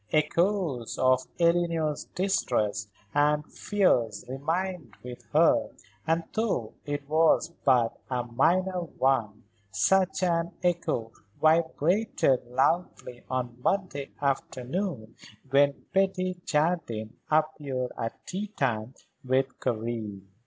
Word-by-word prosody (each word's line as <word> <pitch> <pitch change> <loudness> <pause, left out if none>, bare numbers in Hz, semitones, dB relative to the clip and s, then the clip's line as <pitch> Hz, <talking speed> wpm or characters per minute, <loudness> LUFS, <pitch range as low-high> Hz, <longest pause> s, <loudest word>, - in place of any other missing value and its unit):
Echoes 155 - +1
of 130 0 +3
Eleanor's 170 -3 +1
distrusts 120 - 0 0.3
and 150 +1 +2
fears 125 - +1
remained 165 +7 -3
with 125 0 -8
her, - - +4 0.4
and, 165 +1 +2
though 205 - -1
it 145 -1 -3
was 160 +2 +3
but 125 -4 +3
a 125 -2 -1
minor 180 +10 +1
one, 130 -9 0 0.3
such 190 - +2
an 170 -1 +1
echo 170 -10 0 0.3
vibrated 160 - +2
loudly 125 -1 0
on 125 -2 -2
Monday 180 -6 -1
afternoon 135 - -2 0.4
when 140 +1 +3
Betty 185 -2 +1
Jardine 150 -9 0
appeared 150 -5 0
at 115 - -5
tea 200 +3 -4
time 125 - -2 0.3
with 130 +1 0
Karen. 110 -4 -3
145 Hz, 100 wpm, -28 LUFS, 125-175 Hz, 0.4 s, her